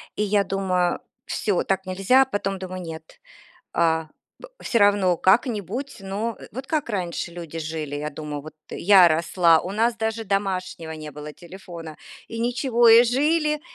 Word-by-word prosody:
И 210 - 0
я 205 0 +2
думаю: 185 -3 0 0.3
"Всё, 200 -4 -1
так 190 0 -1
нельзя". 195 +9 +3
Потом 205 -5 -3
думаю: 185 0 -6
"Нет, 160 -2 -10 0.6
а, 160 -1 +1 0.5
всё 235 - +1
равно 200 -3 +4
как-нибудь, 225 - 0
но 205 +4 -3 0.2
вот 260 +2 -7
как 310 -5 -1
раньше 175 -3 -3
люди 170 -2 -7
жили". 155 -2 -4
Я 150 +1 -4
думаю, 150 -1 -6
вот 155 +1 -11 0.2
я 190 -2 +6
росла, 165 0 +3
у 185 - -6
нас 230 +3 +1
даже 225 0 -2
домашнего 190 -5 -2
не 155 -1 -8
было 150 0 -9
телефона, 170 -2 -10 0.3
и 230 - -6
ничего, 240 0 +2
и 230 +1 +9
жили, 300 +5 +1
190 Hz, 155 wpm, -23 LUFS, 165-225 Hz, 0.6 s, и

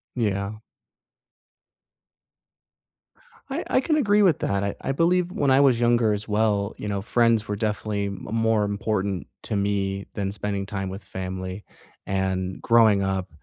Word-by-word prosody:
Yeah. 100 -2 -1 2.9
I 300 +6 -2
I - - +3
can 310 +2 +1
agree 210 -7 +3
with 180 -7 +4
that, 100 0 0
I 100 - -2
I - - -1
believe 175 +5 +2
when 140 -5 +1
I 135 - +6
was 130 -4 +4
younger, 120 -2 +3
as 105 +1 -4
well, 105 -1 +1
you 105 - -6
know, 100 -1 -2
friends 115 -1 +2
were 105 - -2
definitely 105 -1 -2
m 100 -1 -6
more 115 -1 +2
important 100 -2 -2 0.2
to 105 - -2
me 100 -1 -1
than 100 -2 -2
spending 100 -1 -3
time 95 -1 -4
with 95 +2 -7
family. 95 +1 -5 0.4
And 95 -1 -2
growing 110 -4 +5
up, 95 -1 -2
105 Hz, 150 wpm, -24 LUFS, 100-115 Hz, 2.9 s, I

